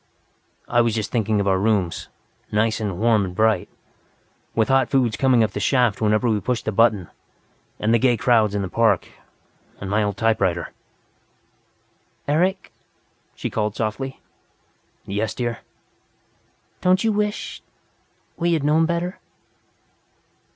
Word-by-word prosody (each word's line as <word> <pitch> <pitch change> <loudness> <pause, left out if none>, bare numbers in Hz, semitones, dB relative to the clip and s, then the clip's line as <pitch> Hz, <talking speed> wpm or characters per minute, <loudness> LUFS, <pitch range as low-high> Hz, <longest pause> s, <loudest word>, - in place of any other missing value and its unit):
"I 120 0 +3
was 115 -2 +1
just 110 -2 -3
thinking 110 -3 +1
of 100 - 0
our 95 -1 +2
rooms, 100 -4 0 0.4
nice 110 +1 +1
and 100 -5 -3
warm 110 0 +3
and 90 -2 -5
bright, 110 -2 +2 0.9
with 110 +1 +2
hot 135 -2 +3
foods 125 -6 +2
coming 125 -2 +3
up 105 - 0
the 105 - -4
shaft 120 -1 +2
whenever 110 +3 +2
we 110 -2 +1
pushed 120 +3 -2
the 110 - 0
button, 105 -4 +2 0.7
and 110 +2 +1
the 120 - +4
gay 120 0 +3
crowds 110 -3 +2
in 100 - -1
the - - -3
park, 115 +4 +1 0.7
and 100 0 -5
my 105 +1 +2
old 100 -1 -1
typewriter." 100 -6 0 1.6
"Eric?" 180 +6 0 0.6
she - - -4
called 105 -1 -1
softly. 125 +5 -3 0.9
"Yes, 105 +2 -2
dear." 120 -2 -3 1.2
"Don't 185 +2 +3
you 225 - +2
wish 210 +1 -2 0.8
we 170 0 +1
had 155 -4 0
known 155 +2 +3
better?" 170 +2 -2
110 Hz, 140 wpm, -22 LUFS, 105-130 Hz, 1.6 s, the